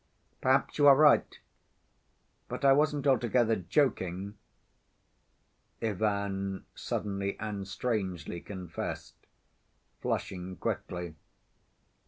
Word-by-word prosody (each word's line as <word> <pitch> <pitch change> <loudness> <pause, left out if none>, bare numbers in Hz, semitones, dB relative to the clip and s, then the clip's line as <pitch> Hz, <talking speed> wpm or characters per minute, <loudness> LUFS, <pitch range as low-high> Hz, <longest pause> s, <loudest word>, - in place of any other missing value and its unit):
"Perhaps 135 +3 +2
you 145 - +7
are 140 - +10
right!... 150 +1 +5 1.1
But - - -4
I 135 - +8
wasn't 145 0 +2
altogether 120 -4 +3
joking," 100 - 0 1.4
Ivan 100 -2 -1
suddenly 100 -1 -3
and 100 -2 -4
strangely 95 -6 -3
confessed, 90 -4 -7 0.7
flushing 90 0 -3
quickly. 90 0 -4
100 Hz, 80 wpm, -30 LUFS, 95-130 Hz, 1.4 s, are